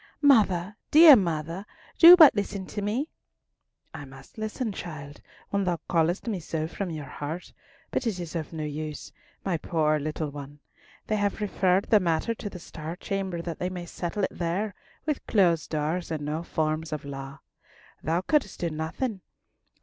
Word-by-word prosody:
"Mother, 210 -8 +4
dear 310 -1 +10
mother, 170 -2 -1 0.4
do 345 +1 +12
but 315 -5 +9
listen 200 -2 -3
to 205 - -5
me." 235 +10 -1 0.8
"I 160 -2 -7
must 135 +8 -13
listen, 215 +2 -3
child, 150 -6 -8 0.3
when 200 0 +1
thou 180 -2 0
callest 170 +2 +1
me 210 -5 -1
so 160 -1 -3
from 185 +2 -4
your 155 -3 -5
heart; 150 +6 -6 0.4
but 255 - -1
it 200 -5 -2
is 170 -1 -6
of 160 -2 -4
no 160 -2 -4
use, 150 0 -5 0.3
my 185 -4 0
poor 155 -1 +1
little 155 0 -3
one. 145 0 -9 0.5
They 215 - 0
have 205 0 -1
referred 195 -2 +2
the 215 - +5
matter 170 +4 0
to 215 -2 -6
the 190 - -9
Star 165 -1 -7
Chamber, 190 -3 -3
that 170 -1 -5
they 180 - -1
may 180 -1 -6
settle 175 +3 -4
it - - 0
there 185 +5 -2 0.3
with 300 -3 -1
closed 175 -6 +2
doors 160 +3 -2
and 155 -3 -3
no 155 +2 -2
forms 155 -1 -2
of 150 -2 -4
law. 135 0 -7 0.6
Thou 165 +3 0
couldst 270 0 0
do 170 -2 -1
nothing! 185 +8 -3
175 Hz, 175 wpm, -27 LUFS, 155-200 Hz, 0.8 s, do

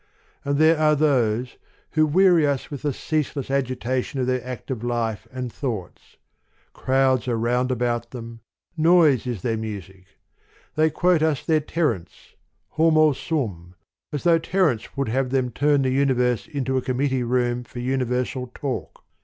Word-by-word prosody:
And 140 0 0
there 155 +1 +4
are 155 -1 +4
those, 125 -5 +1 0.3
who 155 -1 +3
weary 175 -1 +4
us 140 0 -2
with 145 - -6
the 145 - 0
ceaseless 145 -1 -2
agi 135 -2 0
tation 130 +3 -2
of 130 - +1
their 130 -1 -1
active 125 -1 -6
life 115 -2 -2
and 125 -2 -5
thoughts; 115 - -6 0.6
crowds 130 -1 +1
are 120 -2 0
round 125 +3 0
about 120 -1 -1
them, 115 -2 -9 0.4
noise 160 -6 +4
is 115 -7 -4
their 115 -2 0
music: 95 -4 -7 0.7
they 155 +1 +3
quote 175 +1 +2
us 155 -4 0
their 160 -2 +3
Terence, 150 - -3 0.4
Homo 155 -2 +4
sum, 100 - -4 0.4
as 145 - -4
though 170 -1 +4
Terence 160 - 0
would 140 -4 -1
have 130 +2 0
them 130 -1 0
turn 145 +3 +2
the 130 - +1
universe 125 -3 +1
into 130 -2 -2
a - - +1
committee 130 +1 0
room 120 0 0
for 120 - -14
universal 125 0 -1
talk. 135 -3 -5
130 Hz, 155 wpm, -23 LUFS, 120-150 Hz, 0.7 s, there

